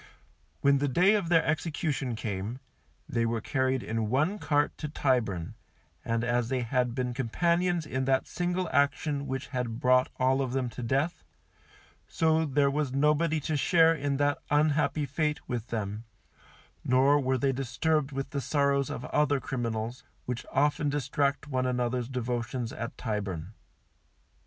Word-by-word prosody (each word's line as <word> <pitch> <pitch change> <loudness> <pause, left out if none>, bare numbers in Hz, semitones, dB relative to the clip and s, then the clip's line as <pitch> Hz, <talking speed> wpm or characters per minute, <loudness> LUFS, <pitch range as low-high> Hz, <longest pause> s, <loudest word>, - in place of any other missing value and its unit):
When 140 0 +4
the 145 - +1
day 180 +10 +4
of 200 -6 0
their 165 -2 +4
execution 150 -4 -1
came, 110 +3 -4 0.5
they 115 -1 0
were 115 0 0
carried 130 +2 0
in 110 -1 -2
one 155 - +1
cart 145 -3 +1
to 150 - -4
Tyburn, 110 - 0 0.5
and 115 0 -1
as 120 -1 0
they 130 -1 0
had 125 0 0
been 125 -1 -1
companions 170 +7 +1
in 130 -2 -2
that 135 0 +2
single 180 +1 -2
action 140 +1 +1
which 130 0 -4
had 120 -3 -3
brought 130 -1 +4
all 130 +1 +2
of 130 -2 -2
them 130 -2 0
to 125 - -8
death, 135 +8 -1 0.8
so 160 -1 +2
there 140 0 +2
was 145 -2 -1
nobody 150 +3 +2
to 155 +2 -2
share 165 +2 +4
in 140 -3 -1
that 145 0 +1
unhappy 150 0 +2
fate 150 +2 -2
with 120 -2 -3
them, 105 0 -4 0.8
nor 135 +3 +4
were 130 -1 +1
they 135 +2 +1
disturbed 135 +3 0
with 135 0 -4
the 140 - -2
sorrows 140 0 +1
of 125 - -5
other 145 -2 +2
criminals, 120 -2 -3 0.2
which 125 -1 -4
often 145 +1 +2
distract 140 0 0
one 130 -2 0
another's 125 -1 -1
devotions 120 -1 -3
at 115 +1 -6
Tyburn. 100 -5 -4
135 Hz, 155 wpm, -29 LUFS, 120-150 Hz, 0.8 s, When